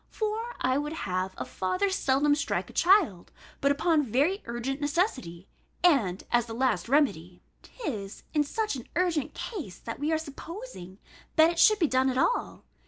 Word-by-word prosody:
For 445 Hz, +2 st, -3 dB
I 260 Hz, +2 st, +1 dB
would 295 Hz, +1 st, -3 dB
have 185 Hz, +1 st, -2 dB
a -, -, -4 dB
father 365 Hz, -, -1 dB
seldom 290 Hz, -4 st, +2 dB
strike 290 Hz, -1 st, -2 dB
a -, -, -20 dB
child, 350 Hz, -, +3 dB, 0.3 s
but 280 Hz, -, +3 dB
upon 310 Hz, +2 st, +2 dB
very 290 Hz, -, +1 dB
urgent 245 Hz, +4 st, -4 dB
necessity, 285 Hz, -, -1 dB, 0.4 s
and 230 Hz, -, +3 dB
as 240 Hz, -1 st, +2 dB
the 225 Hz, -, -6 dB
last 235 Hz, -6 st, 0 dB
remedy." 195 Hz, -, +1 dB, 0.2 s
'Tis 220 Hz, -, -6 dB
in 300 Hz, -2 st, +3 dB
such 430 Hz, +6 st, -2 dB
an 250 Hz, -, -8 dB
urgent 335 Hz, -5 st, 0 dB
case 315 Hz, -, -6 dB
that 230 Hz, -, -7 dB
we 295 Hz, +3 st, 0 dB
are 320 Hz, -, +3 dB
supposing 315 Hz, -, -9 dB, 0.4 s
that 320 Hz, +1 st, +6 dB
it 340 Hz, -, -5 dB
should 430 Hz, +5 st, +6 dB
be 345 Hz, -, +3 dB
done 260 Hz, -2 st, +2 dB
at 255 Hz, -, -2 dB
all. 485 Hz, -, 0 dB
285 Hz, 170 wpm, -28 LUFS, 230-340 Hz, 0.4 s, that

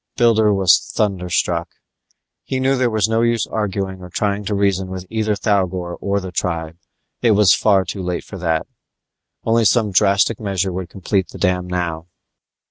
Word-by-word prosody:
Builder 110 Hz, -4 st, +4 dB
was 95 Hz, -2 st, +3 dB
thunderstruck. 90 Hz, -4 st, 0 dB, 0.7 s
He 130 Hz, -, -3 dB
knew 135 Hz, +1 st, +2 dB
there 125 Hz, -2 st, +1 dB
was 110 Hz, -2 st, +1 dB
no 110 Hz, +1 st, +1 dB
use 115 Hz, -2 st, +1 dB
arguing 95 Hz, -3 st, -3 dB
or 90 Hz, -, -9 dB
trying 100 Hz, +1 st, -1 dB
to 105 Hz, -, -1 dB
reason 100 Hz, -2 st, +1 dB
with 95 Hz, -1 st, -6 dB
either 110 Hz, -1 st, 0 dB
Thougor 95 Hz, -4 st, -1 dB
or 100 Hz, 0 st, 0 dB
the 95 Hz, -2 st, -7 dB
tribe. 85 Hz, -1 st, -3 dB, 0.4 s
It 115 Hz, -2 st, +4 dB
was 105 Hz, -3 st, +5 dB, 0.4 s
too 95 Hz, -, -4 dB
late 90 Hz, -1 st, -3 dB
for 100 Hz, -, -9 dB
that; 80 Hz, -2 st, 0 dB, 0.8 s
only 115 Hz, +1 st, +2 dB
some 110 Hz, -1 st, +3 dB
drastic 100 Hz, +2 st, +3 dB
measure 95 Hz, -3 st, -1 dB
would 90 Hz, -1 st, -5 dB
complete 95 Hz, 0 st, -1 dB
the -, -, -10 dB
dam 90 Hz, -1 st, 0 dB
now. 85 Hz, -2 st, -3 dB
100 Hz, 165 wpm, -19 LUFS, 90-110 Hz, 0.8 s, was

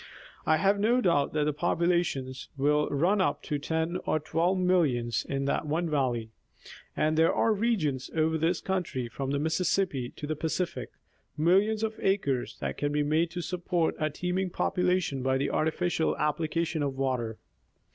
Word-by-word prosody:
I 155 Hz, -, +5 dB
have 195 Hz, +5 st, +2 dB
no 235 Hz, +5 st, +3 dB
doubt 170 Hz, -, +2 dB
that 150 Hz, -1 st, +1 dB
the 150 Hz, 0 st, 0 dB
population 170 Hz, -4 st, 0 dB, 0.2 s
will 150 Hz, +2 st, +2 dB
run 180 Hz, +8 st, +2 dB
up -, -, 0 dB
to 145 Hz, -2 st, -2 dB
ten 160 Hz, +4 st, -1 dB
or 155 Hz, -, +2 dB
twelve 170 Hz, +5 st, 0 dB
millions 140 Hz, -11 st, +1 dB
in 135 Hz, 0 st, -1 dB
that 140 Hz, -, -1 dB
one 165 Hz, +4 st, 0 dB
valley, 120 Hz, -6 st, 0 dB, 0.7 s
and 155 Hz, +1 st, +2 dB
there 160 Hz, +1 st, +4 dB
are 225 Hz, -, +2 dB
regions 195 Hz, -, 0 dB
over 160 Hz, 0 st, +2 dB
this 165 Hz, +3 st, +1 dB
country 180 Hz, -10 st, -2 dB
from 135 Hz, +3 st, -4 dB
the 140 Hz, -, 0 dB
Mississippi 160 Hz, -3 st, 0 dB
to -, -, -6 dB
the 155 Hz, +1 st, -2 dB
Pacific, 165 Hz, +3 st, -2 dB, 0.5 s
millions 195 Hz, +7 st, +3 dB
of 220 Hz, 0 st, -2 dB
acres, 140 Hz, -11 st, 0 dB
that 70 Hz, -1 st, -3 dB
can 145 Hz, -, -1 dB
be 150 Hz, 0 st, +1 dB
made 155 Hz, +3 st, +1 dB
to 175 Hz, +1 st, -5 dB
support 175 Hz, -1 st, -1 dB
a 155 Hz, -, +1 dB
teeming 180 Hz, +4 st, -2 dB
population 180 Hz, -6 st, 0 dB
by 130 Hz, +1 st, +1 dB
the 135 Hz, -, -1 dB
artificial 160 Hz, +1 st, 0 dB
application 160 Hz, +2 st, -1 dB
of 140 Hz, -2 st, -1 dB
water. 125 Hz, -5 st, -1 dB
160 Hz, 165 wpm, -28 LUFS, 140-180 Hz, 0.7 s, I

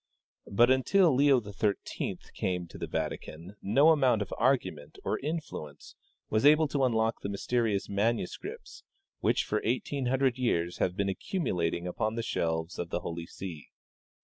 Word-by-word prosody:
But 120 Hz, +5 st, +5 dB
until 160 Hz, +6 st, +4 dB
Leo 140 Hz, 0 st, +5 dB
XIII 105 Hz, -1 st, -2 dB, 0.2 s
came 90 Hz, -1 st, -2 dB
to 85 Hz, -, -12 dB
the -, -, -3 dB
Vatican 85 Hz, +6 st, -5 dB
no 135 Hz, +10 st, +5 dB
amount 130 Hz, -9 st, +4 dB
of 100 Hz, -, -8 dB
argument 95 Hz, -, 0 dB
or -, -, -1 dB
influence 145 Hz, -, -6 dB, 0.4 s
Avas 110 Hz, +2 st, +2 dB
able 155 Hz, +2 st, +6 dB
to 140 Hz, -2 st, 0 dB
unlock 115 Hz, -2 st, +1 dB
the 100 Hz, -, -3 dB
mysterious 105 Hz, 0 st, 0 dB
manuscrii3ts, 115 Hz, -, -2 dB, 0.4 s
which -, -, +2 dB
for -, -, -1 dB
eighteen 145 Hz, -, -1 dB
hundred 130 Hz, 0 st, +1 dB
years 85 Hz, -8 st, 0 dB
have 90 Hz, +1 st, 0 dB
been 100 Hz, -1 st, +1 dB
accumulating 90 Hz, -, -1 dB
upon 110 Hz, +5 st, -2 dB
the 115 Hz, -, -2 dB
shelves 80 Hz, -5 st, -2 dB
of 85 Hz, -, -3 dB
the -, -, -2 dB
Holy 85 Hz, 0 st, -5 dB
See. 85 Hz, -6 st, -8 dB
110 Hz, 150 wpm, -30 LUFS, 90-135 Hz, 0.4 s, able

